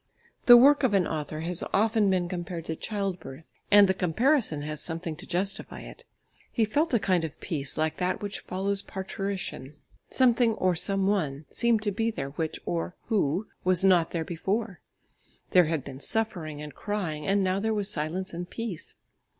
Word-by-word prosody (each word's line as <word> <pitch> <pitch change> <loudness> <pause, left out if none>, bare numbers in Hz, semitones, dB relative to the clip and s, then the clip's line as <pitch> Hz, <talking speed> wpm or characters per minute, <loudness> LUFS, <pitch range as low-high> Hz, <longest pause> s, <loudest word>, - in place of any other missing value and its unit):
The 240 -1 +11
work 280 +4 +6
of 250 -7 +2
an 185 -3 +3
author 155 0 -4
has 170 +1 0
often 215 -1 +3
been 180 -2 +1
compared 175 -2 -5
to 160 - -3
childbirth, 180 -8 -5 0.2
and 205 -1 +7
the 190 - +2
comparison 190 - +1
has 150 0 -5
something 165 -1 -4
to 195 - -10
justify 190 +2 -3
it. - - -12 0.5
He 225 - +2
felt 290 +6 +1
a - - +4
kind 185 -4 +1
of 160 - -6
peace 145 -6 -4
like 155 0 0
that 180 0 -1
which 205 -1 -5
follows 195 +2 -2
parturition; 190 -8 -5 0.3
something 240 -3 +4
or 185 -4 +1
some 195 +3 +1
one 155 -8 0
seemed 235 -3 +2
to 205 - 0
be 225 +3 0
there 140 -11 -4
which, 160 +2 -3
or 85 0 -3
who, 195 -2 +1 0.2
was 185 0 +4
not 180 -4 +4
there 165 -2 -3
before; 190 +2 -2 0.7
there 180 -1 +6
had 155 -3 -1
been 135 -1 -9
suffering 165 -7 -2
and 150 -2 -8
crying 175 -8 -3
and 195 0 +2
now 185 +1 +1
there 220 +2 0
was 205 -2 0
silence 180 +2 -2
and 175 +1 -5
peace. 215 -8 -6
185 Hz, 180 wpm, -27 LUFS, 160-205 Hz, 0.7 s, The